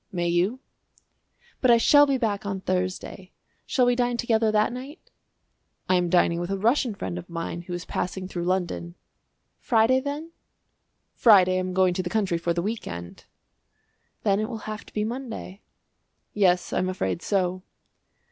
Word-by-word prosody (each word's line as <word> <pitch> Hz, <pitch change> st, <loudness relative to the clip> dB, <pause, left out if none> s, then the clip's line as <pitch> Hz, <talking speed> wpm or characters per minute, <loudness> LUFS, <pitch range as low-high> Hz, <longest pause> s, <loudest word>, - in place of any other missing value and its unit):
"May 175 Hz, -2 st, -1 dB
you?" 185 Hz, +9 st, +1 dB, 1.0 s
"But 255 Hz, -, +3 dB
I 235 Hz, -, +7 dB
shall 290 Hz, +5 st, +6 dB
be 275 Hz, -1 st, +1 dB
back 215 Hz, -5 st, -1 dB
on 195 Hz, -2 st, -4 dB
Thursday. 185 Hz, +1 st, -3 dB, 0.3 s
Shall 255 Hz, -, +2 dB
we 245 Hz, 0 st, +3 dB
dine 245 Hz, -1 st, 0 dB
together 225 Hz, -2 st, +2 dB
that 215 Hz, +2 st, +2 dB
night?" 270 Hz, +6 st, -10 dB, 0.8 s
"I -, -, +2 dB
am 180 Hz, -1 st, +2 dB
dining 170 Hz, -1 st, +3 dB
with 175 Hz, +1 st, -4 dB
a 195 Hz, -, -1 dB
Russian 230 Hz, +2 st, +1 dB
friend 90 Hz, -, -4 dB
of -, -, -12 dB
mine 170 Hz, 0 st, -4 dB
who 175 Hz, +1 st, -8 dB
is 175 Hz, 0 st, -5 dB
passing 185 Hz, +1 st, -3 dB
through 175 Hz, -2 st, -4 dB
London." 175 Hz, -1 st, -2 dB, 0.6 s
"Friday, 235 Hz, +2 st, +3 dB
then?" 290 Hz, +4 st, -5 dB, 0.8 s
"Friday 185 Hz, -5 st, +5 dB
I -, -, +1 dB
am 185 Hz, 0 st, -3 dB
going 185 Hz, -1 st, +3 dB
to 185 Hz, -, -1 dB
the 175 Hz, -, -4 dB
country 190 Hz, -5 st, 0 dB
for 170 Hz, 0 st, -1 dB
the 170 Hz, 0 st, -1 dB
week 220 Hz, +3 st, -3 dB
end." 85 Hz, 0 st, -8 dB, 1.0 s
"Then 200 Hz, -2 st, +2 dB
it 215 Hz, -, -2 dB
will 225 Hz, -3 st, -7 dB
have 215 Hz, 0 st, -6 dB
to -, -, -14 dB
be 210 Hz, -, -1 dB
Monday." 225 Hz, -4 st, -6 dB, 0.7 s
"Yes, 180 Hz, -3 st, +2 dB
I -, -, +1 dB
am 185 Hz, -, 0 dB
afraid 95 Hz, -, -2 dB
so." 185 Hz, -2 st, 0 dB
195 Hz, 175 wpm, -25 LUFS, 180-230 Hz, 1.0 s, I